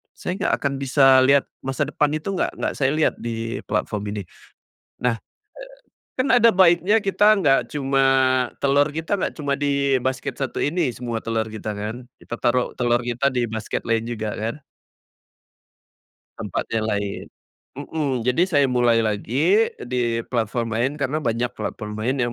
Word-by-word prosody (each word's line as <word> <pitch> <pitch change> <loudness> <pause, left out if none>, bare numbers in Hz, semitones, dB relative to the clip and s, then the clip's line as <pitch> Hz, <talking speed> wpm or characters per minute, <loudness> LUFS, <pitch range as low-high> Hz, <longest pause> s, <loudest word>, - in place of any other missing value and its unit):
saya - - -4
nggak 205 - +1
akan 140 -1 0
bisa 135 -1 +5
lihat 140 +1 +5 0.2
masa 135 +2 -1
depan 150 0 +1
itu 155 +5 -4
nggak 190 - -1
nggak - - -2
saya 135 -1 +2
lihat 155 - +2
di 115 +1 -4
platform 105 -2 -2
ini. 105 - -3 0.8
Nah, 125 -1 +1 0.8
eee, - - -80
kan 255 +2 +1
ada 235 -1 +6
baiknya 185 +2 +4
kita 205 -1 0
nggak 135 -8 +4
cuma 135 -2 0 0.6
telur 140 +1 +3
kita 160 +6 -2
nggak - - -2
cuma 140 -2 0
di 140 -2 +1
basket 130 +1 -2
satu 135 - -3
ini 155 -1 0
semua 120 -1 -5
telur 115 -1 -1
kita 110 0 -6
kan, 105 +2 -4 0.2
kita - - -7
taruh 120 +1 +1
telur 120 -1 +1
kita 125 +3 +1
di 125 -2 0
basket 110 -1 -4
lain 115 -1 +1
juga 110 -2 -3
kan? 115 +6 -4 1.8
Tempat - - -3
yang 110 -1 0
lain. 100 -2 -2 0.5
Mhm, 140 -5 -2
jadi 125 +7 +3
saya 145 -4 +4
mulai 120 -2 +3
lagi 140 - +2 0.2
di 120 -2 0
platform 115 -1 -2
lain, 120 +5 +1
karena 140 +2 -1
banyak 120 0 -1
platform 105 -1 -5
lain 125 +5 -1
yang, 120 -2 0
130 Hz, 160 wpm, -22 LUFS, 115-145 Hz, 1.8 s, ada